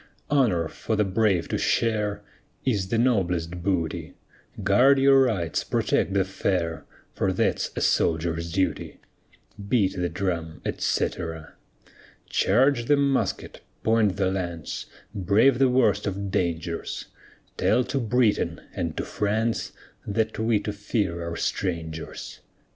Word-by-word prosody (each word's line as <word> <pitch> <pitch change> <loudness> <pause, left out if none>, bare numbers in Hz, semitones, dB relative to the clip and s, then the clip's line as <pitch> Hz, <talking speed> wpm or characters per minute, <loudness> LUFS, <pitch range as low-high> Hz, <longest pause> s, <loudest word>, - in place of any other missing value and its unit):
Honor 110 - +3
for 110 - -3
the 105 - +3
brave 95 -2 +1
to - - -1
share 105 -3 0 0.4
Is 105 -8 +1
the 115 - 0
noblest 90 -8 +1
booty; 85 -4 -2 0.5
Guard 125 +8 +5
your 135 0 +6
rights, 100 -11 0
protect 100 - 0
the 95 -1 +3
fair, 90 -4 -2 0.3
For - - 0
that's - - 0
a - - -2
soldier's 85 0 +1
duty. 95 +2 -1 0.7
Beat 100 -6 +2
the 90 -1 -1
drum, 85 -3 -3
etc. 80 -3 -2 0.7
Charge 125 +3 +3
the 145 +3 +4
musket, 140 -1 -1 0.2
point 110 -4 +2
the 95 -2 +1
lance, 85 -4 -4 0.3
Brave 105 +6 +3
the 135 -1 +5
worst 110 -6 +2
of 100 0 -3
dangers; 85 -3 -2 0.5
Tell 125 - +3
to 135 - -2
Britain 115 -2 +1
and - - -3
to - - -2
France, 110 +2 -1 0.4
That 110 +1 -1
we 110 -1 +2
to 105 - -4
fear 100 -4 -2
are 85 - -5
strangers. 80 -4 -4
100 Hz, 125 wpm, -25 LUFS, 85-115 Hz, 0.7 s, your